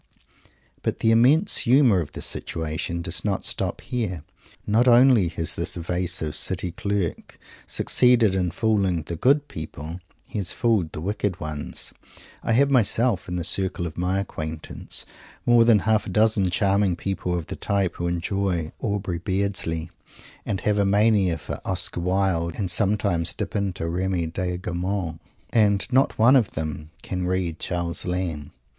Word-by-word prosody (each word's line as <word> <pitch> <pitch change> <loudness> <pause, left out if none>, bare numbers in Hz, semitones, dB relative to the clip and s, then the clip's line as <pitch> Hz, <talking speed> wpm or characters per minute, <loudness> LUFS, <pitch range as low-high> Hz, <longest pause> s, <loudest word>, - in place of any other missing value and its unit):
But - - -2
the 110 - +2
immense 135 - +5
humour 125 -5 +4
of 75 -4 -5
the - - -6
situation 80 +1 -3
does 85 -1 -1
not 100 -3 -1
stop - - -1
here. 100 -10 -3 0.4
Not 115 +4 +3
only 120 -5 +6
has 80 -1 -2
this - - -2
evasive 85 -2 -2
City 90 -1 0
Clerk 100 -1 -3 0.3
succeeded 120 -5 +4
in 90 -2 0
fooling 95 -3 +1
the 85 - -5
"good 140 - +3
people;" 80 +2 -7 0.3
he 105 - -4
has 95 -3 -3
fooled 110 -9 +1
the 75 - -6
"wicked 100 0 -2
ones." 75 -1 -5 0.5
I 115 - 0
have 140 +4 +4
myself 115 -3 +2
in 90 - -4
the 85 - -2
circle 95 0 -2
of 80 - -6
my 90 +2 0
acquaintance 80 -5 -4 0.4
more 120 -1 +5
than 115 -2 +6
half 110 0 +1
a - - -4
dozen 105 -1 +2
charming 95 0 +2
people, 90 -1 -2
of 85 - -4
the - - -6
type 100 -3 -1
who 85 - -2
enjoy 85 -1 -1
Aubrey 100 -6 -2
Beardsley, 95 -3 -2 0.6
and 95 - -2
have 105 +1 +1
a - - +4
mania 100 -3 +3
for - - -7
Oscar 90 -1 -3
Wilde, 90 -2 0
and 95 -4 -1
sometimes 95 -4 +1
dip 105 -1 -4
into 95 -5 -1
Remy 90 0 -1
de 90 +2 -3
Gourmont, 90 -2 -3 0.3
and 100 -3 +3
not 135 +2 +3
one 120 +5 +6
of 120 -6 +2
them 75 0 -5
"can 90 -1 -3
read" 90 -3 -1
Charles 85 -1 -2
Lamb. 90 -5 -3
95 Hz, 160 wpm, -24 LUFS, 85-105 Hz, 0.6 s, only